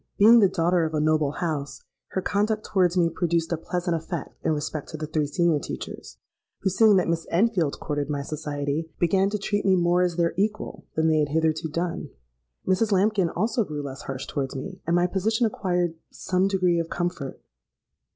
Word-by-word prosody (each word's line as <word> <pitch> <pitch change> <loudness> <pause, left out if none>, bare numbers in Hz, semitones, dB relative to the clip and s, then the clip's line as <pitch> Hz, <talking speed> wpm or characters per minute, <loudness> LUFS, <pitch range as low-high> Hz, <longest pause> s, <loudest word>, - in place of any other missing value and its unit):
Being 225 +4 +8
the 200 -4 +5
daughter 175 -1 +2
of 160 0 -2
a - - +1
noble 155 -1 +2
house, 150 -5 -3 0.2
her 190 - -3
conduct 210 +3 0
towards 185 -2 +2
me 170 -2 +4
produced 165 0 -1
a - - +2
pleasant 175 +1 -2
effect 165 -1 -5
in - - +1
respect 150 -1 -3
to 155 - -6
the 155 - -4
three 155 -1 -1
senior 170 0 +2
teachers, - - -7 0.4
who, 190 - +1
seeing 215 +2 +5
that 185 - +2
Miss 165 0 -1
Enfield 175 -5 +1
courted 145 -2 -3
my 145 -1 -2
society, 150 +1 -3
began 190 +3 +2
to 210 - -1
treat 205 0 -1
me 190 -1 +4
more 175 0 +3
as 180 -2 +1
their 170 -1 +1
equal 210 +2 -2
than 160 0 +2
they 155 -1 +3
had 150 -1 +1
hitherto 160 +1 0
done. 165 -1 -3 0.6
Mrs. 190 +4 +2
Lambkin 195 -2 +3
also 220 +7 0
grew 150 -6 -5
less 135 -1 -7
harsh 135 -1 -5
towards 135 -3 -3
me; 185 +8 -6
and 170 - +2
my 175 0 +3
position 215 +6 +1
acquired 180 -5 0 0.2
some 185 +1 0
degree 185 -3 +2
of 165 0 -3
comfort. 175 -6 -3
170 Hz, 195 wpm, -25 LUFS, 155-190 Hz, 0.6 s, Being